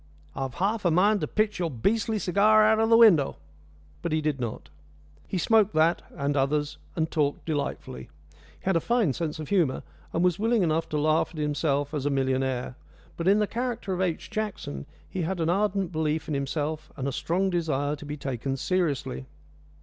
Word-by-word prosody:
"I've 135 -2 -4
half 205 +4 0
a 175 - +3
mind 200 +5 +3
to - - -1
pitch 215 -2 0
your 170 -2 0
beastly 215 - 0
cigar 210 +3 +4
out 220 0 +4
of 225 0 +2
the 225 - +7
window!" 195 -12 +6 0.7
But - - -3
he 155 - +2
did 150 -3 -1
not. 120 -3 -5 0.6
He - - -2
smoked 215 +3 +3
that, 160 +2 +3
and 140 +1 -1
others, 145 +2 0 0.2
and 160 -1 -1
talked 145 -2 0
delightfully. 150 -3 -4 0.2
He - - -26
had 190 -1 +2
a - - +4
fine 225 - +1
sense 160 +2 -3
of 155 -2 -7
humour, 170 -10 +1 0.3
and 170 - 0
was 180 +1 +2
willing 225 -1 +2
enough 165 -1 0
to 150 - -1
laugh 155 +2 +2
at - - -9
himself 145 -1 0
as 145 -2 -1
a - - +2
millionaire; 130 -2 0 0.4
but 170 - -3
in 200 +2 +6
the 210 - +2
character 235 -3 -3
of 180 - -2
H. 180 0 -2
Jackson 210 - -4 0.2
he 185 - -4
had 175 +2 -2
an 165 0 +1
ardent 195 -1 0
belief 155 -1 -1
in 155 - -2
himself 150 +3 -3
and 135 -1 -2
a - - -1
strong 185 +8 0
desire 150 -4 0
to - - -11
be 150 +1 -5
taken 135 -1 -3
seriously. 140 - -1
160 Hz, 195 wpm, -27 LUFS, 145-195 Hz, 0.7 s, the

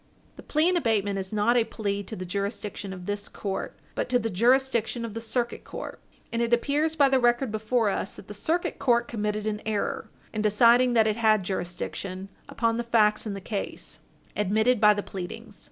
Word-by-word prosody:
The - - -11
plea 310 +2 +1
in 365 - +3
abatement 205 - +1
is 190 -1 -4
not 215 +3 +2
a 240 - +5
plea 200 -3 -3
to 210 +2 -7
the 185 - -6
jurisdiction 200 +1 -4
of 180 -1 -8
this 205 +1 -3
court, 195 -2 -4 0.2
but - - -2
to 250 - +4
the 225 -2 -2
jurisdiction 240 +2 +2
of 225 - -6
the 230 - -5
Circuit 240 +1 -2
Court. - - -7 0.3
And 230 - 0
it 235 0 0
appears 295 +6 +1
by 285 -3 +5
the 265 -1 +3
record 240 0 +2
before 220 +1 +1
us 195 - -3
that - - -12
the 210 - -7
Circuit 325 - -1
Court 240 -3 +2
committed 210 -1 -2
an 215 -1 -2
error 215 -2 -2 0.2
in 215 - -1
deciding 235 +4 +5
that 225 -2 +5
it 215 0 +1
had 215 -3 +3
jurisdiction 185 +1 -4 0.2
upon 230 -1 0
the 240 - -1
facts 220 -2 +3
in 200 - -3
the 195 - -7
case 200 +1 -5 0.4
admitted 220 +4 +2
by 210 -1 +7
the 205 - -3
pleadings. 200 +3 -8
220 Hz, 200 wpm, -27 LUFS, 205-240 Hz, 0.4 s, by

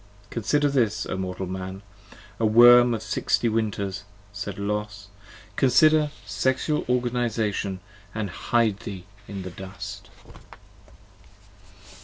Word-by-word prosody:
Consider 145 +6 +1
this, 115 -7 +1
O - - -3
mortal 95 0 -4
Man: 95 +1 -6 0.6
O 115 - +2
worm 120 +2 +7
of 110 - -6
sixty 110 +2 0
winters, 105 -4 -2 0.3
said 100 -1 -5
Los, 100 0 -4 0.4
58 - - -28
Consider 150 +3 +4
Sexual 130 +3 0
Organization 115 -6 -1 0.2
& 100 0 -25
hide 110 +1 0
thee 100 -6 -8 0.2
in 100 -2 -6
the 90 - -7
dust. 100 +2 -9
105 Hz, 110 wpm, -25 LUFS, 100-120 Hz, 0.6 s, worm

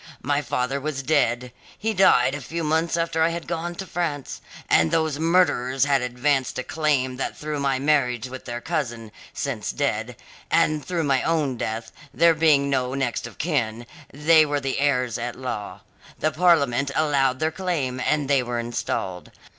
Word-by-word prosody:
My 145 +2 +1
father 135 0 -2
was 140 -1 -3
dead; 125 -4 +1 0.3
he 220 +1 -1
died 135 -10 +4
a 145 - -4
few 165 +5 -4
months 160 +2 +1
after 165 -1 0
I 160 - +4
had 170 0 -5
gone 170 +1 -3
to 190 - -6
France; 160 -7 -3 0.3
and 80 0 +4
those 160 -2 0
murderers 145 -6 +2
had 140 -2 +2
advanced 125 +2 0
a 130 - -2
claim 135 -5 0
that - - -3
through 150 -1 -4
my 135 -1 +1
marriage 130 -4 +1
with 130 0 -9
their 120 -1 -5
cousin, 120 -10 -3 0.2
since 125 -7 -3
dead, 125 -4 -2 0.3
and 155 -1 +2
through 175 -2 -2
my 135 -3 +2
own 155 -6 0
death, 115 0 -4 0.2
there 165 +3 +4
being 155 -3 +3
no 130 -1 0
next 130 -4 -2
of - - -14
kin, 120 -8 -1 0.3
they 155 +3 +5
were 145 -1 -1
the 135 -1 -2
heirs 125 -4 +1
at 120 0 -4
law. 105 -6 -5 0.4
The 155 - 0
Parliament 140 -6 +3
allowed 140 -4 +2
their 155 +3 0
claim, 155 -9 -2
and 145 +2 0
they 140 -2 +3
were 120 -1 -3
installed. 115 -6 -3
140 Hz, 175 wpm, -24 LUFS, 125-155 Hz, 0.4 s, they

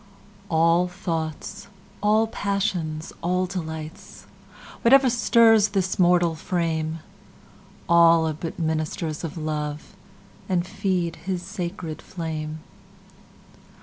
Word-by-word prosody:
Love 195 -4 -6
ALL 170 +2 +4
thoughts, 165 -3 -4 0.3
all 215 +2 +4
passions, 195 -7 -2
all 180 +2 +1
delights, 160 -3 -7 0.6
Whatever 265 +1 +6
stirs 225 -2 +5
this 195 -3 -1
mortal 175 -2 +4
frame, 160 -1 -2 0.9
All 170 -1 +6
are 155 - -1
but 160 +2 -6
ministers 155 -1 -2
of 165 0 -5
Love, 155 +4 -4 0.5
And 180 -2 +1
feed 180 -3 -1
his 180 -1 -4
sacred 175 -4 -5
flame. 155 -3 -5
170 Hz, 100 wpm, -24 LUFS, 160-195 Hz, 0.9 s, Whatever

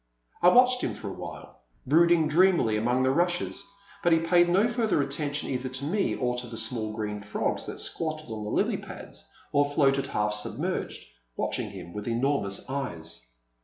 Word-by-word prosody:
I 175 - +7
watched 250 +4 +5
him - - -2
for 100 - -6
awhile, 80 -6 -9 0.3
brooding 165 +2 +4
dreamily 165 - +4
among 120 +4 +1
the 130 - +3
rushes, 175 +4 0 0.4
but 175 - +2
he 165 - +6
paid 175 +1 +4
no 195 +6 +4
further 235 -6 +1
attention 145 +1 -2
either 130 0 -2
to 130 +2 -5
me 195 +6 0
or 125 -1 0
to 125 0 -4
the 115 -1 -7
small 110 -1 -2
green 105 -1 -4
frogs 105 0 -2
that - - -6
squatted 155 -5 -2
on 110 -1 -5
the 105 - -4
lily - - +1
pads - - -10 0.3
or 145 0 +4
floated 140 -2 +2
half 105 0 0
submerged, 105 0 -2 0.3
watching - - -2
him 85 - -9
with 105 +1 -6
enor 135 +5 +1
mous 100 0 -1
eyes. 80 - -5
135 Hz, 180 wpm, -27 LUFS, 110-165 Hz, 0.4 s, I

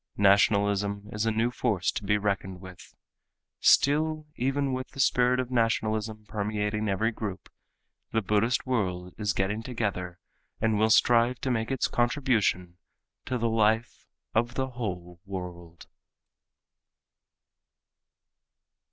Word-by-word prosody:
Nationalism 100 0 +3
is 105 0 -1
a - - +3
new 115 +2 +1
force 105 -8 0
to - - -5
be 105 +1 +2
reckoned 100 -2 -2
with. 95 -1 -13 0.6
Still 155 +2 +3
even 135 +2 0
with 130 0 -3
the - - -13
spirit 125 -1 +3
of 130 0 -3
nationalism 110 -2 0
permeating 105 0 -2
every 110 +4 +1
group, 105 -4 -6 0.6
the 110 0 0
Buddhist 105 +5 +1
world 90 -8 -2
is 105 -2 0
getting 95 +4 -1
together 100 -7 -3 0.4
and 110 -2 +1
will 110 +1 +3
strive 120 +2 +4
to 130 - -1
make 115 -2 -1
its 135 -1 0
contribution 115 -9 0 0.5
to 130 - -1
the 115 0 0
life 110 +1 +1 0.3
of 120 +2 0
the 130 0 -1
whole 90 -8 -6
world. 90 -3 -8
110 Hz, 125 wpm, -27 LUFS, 100-120 Hz, 0.6 s, strive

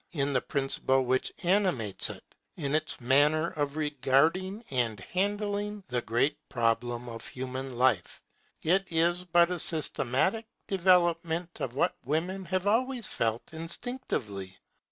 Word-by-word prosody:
In 140 -3 0
the 125 - +2
principle 135 -1 +1
which 130 +1 +1
animates 175 - +2
it, - - -8 0.3
in 140 -4 -2
its 155 0 0
manner 145 +6 +3
of 145 -3 -2
regarding 155 - +1
and 120 -5 0
of - - -9
handling 205 +1 -1
the 125 -1 0
great 120 +6 +1
problem 120 0 0
of 115 -1 -7
human 130 0 -5
life, 125 -8 +1 0.4
it 190 +4 +3
is 170 +2 +2
but 175 0 +4
a 180 - -2
systematic 160 - 0 0.2
development 175 -2 +2
of 125 -1 -3
what - - +1
women 175 +8 -2
have 185 +2 -1
always 240 +3 +1
felt 115 +5 -2
instinctively. 160 - -4
155 Hz, 135 wpm, -29 LUFS, 130-185 Hz, 0.4 s, but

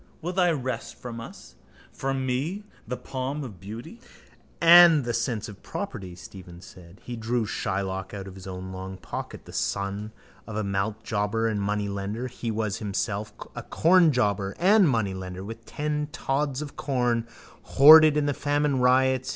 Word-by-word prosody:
Will 175 +2 -4
they 180 -2 +3
wrest 130 -5 -4
from 115 -2 -7
us, 65 - -11 0.4
from 135 -1 -2
me, 145 +11 -2 0.2
the 125 +2 -3
palm 135 +3 -4
of 105 -9 -9
beauty? 115 - -9 0.6
—And 170 -4 +8
the 120 - -1
sense 115 -2 -2
of 100 -2 -11
property, 105 - -6
Stephen 90 -1 -12
said. 90 0 -15
He 120 - -6
drew 115 +1 -1
Shylock 95 -2 -3
out 100 -1 -7
of 95 - -9
his 95 0 -11
own 95 0 -6
long 95 0 -7
pocket. - - -7
The - - -12
son 100 +2 -2 0.4
of 110 - -7
a 110 - -1
maltjobber 105 +2 -1
and 105 -2 -1
moneylender 100 +2 -2
he 120 -1 -5
was 110 -2 -2
himself 105 0 -3 0.2
a - - -4
cornjobber 125 - +2
and 195 0 +5
moneylender, 95 -5 -2
with 115 +3 -9
ten 150 0 -2
tods 140 0 -1
of 145 - -10
corn 120 -4 0 0.3
hoarded 155 +2 +8
in 150 - +1
the 145 - +1
famine 145 -1 0
riots. 130 +1 +3
115 Hz, 160 wpm, -26 LUFS, 100-140 Hz, 0.6 s, And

